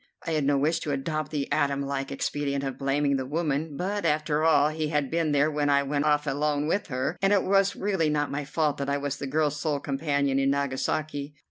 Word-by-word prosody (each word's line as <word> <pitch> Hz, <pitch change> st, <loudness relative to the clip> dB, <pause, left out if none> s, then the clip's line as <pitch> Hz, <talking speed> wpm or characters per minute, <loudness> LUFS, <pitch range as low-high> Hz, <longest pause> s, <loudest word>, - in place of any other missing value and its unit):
I 165 Hz, -, -2 dB
had 155 Hz, -3 st, +1 dB
no 140 Hz, 0 st, +3 dB
wish 155 Hz, +4 st, +1 dB
to 150 Hz, -, -3 dB
adopt 155 Hz, +2 st, -2 dB
the 145 Hz, -3 st, -2 dB
Adam 140 Hz, 0 st, +1 dB
like 135 Hz, 0 st, -3 dB
expedient 140 Hz, 0 st, -2 dB
of 135 Hz, -2 st, -3 dB
blaming 140 Hz, 0 st, +1 dB
the 130 Hz, -, -3 dB
woman; 150 Hz, -1 st, -2 dB
but, 200 Hz, +4 st, -2 dB
after 155 Hz, -1 st, +1 dB
all, 150 Hz, -2 st, +4 dB
he 155 Hz, 0 st, -2 dB
had 150 Hz, -3 st, -1 dB
been 165 Hz, -2 st, +1 dB
there 145 Hz, +2 st, +3 dB
when 145 Hz, -1 st, 0 dB
I 140 Hz, 0 st, +4 dB
went 145 Hz, +1 st, -1 dB
off 150 Hz, 0 st, +2 dB
alone 145 Hz, +1 st, 0 dB
with 195 Hz, +6 st, 0 dB
her, 135 Hz, +5 st, -2 dB
and 195 Hz, 0 st, +3 dB
it 200 Hz, -2 st, +4 dB
was 195 Hz, 0 st, +3 dB
really 190 Hz, -6 st, 0 dB
not 150 Hz, -1 st, 0 dB
my 145 Hz, +1 st, -2 dB
fault 150 Hz, 0 st, 0 dB
that 140 Hz, 0 st, -3 dB
I 140 Hz, -, +1 dB
was 145 Hz, 0 st, -3 dB
the 140 Hz, -, -5 dB
girl's 150 Hz, +1 st, 0 dB
sole 150 Hz, -3 st, 0 dB
companion 140 Hz, -1 st, 0 dB
in 135 Hz, 0 st, +2 dB
Nagasaki. 140 Hz, +1 st, -2 dB
145 Hz, 230 wpm, -27 LUFS, 140-155 Hz, -, all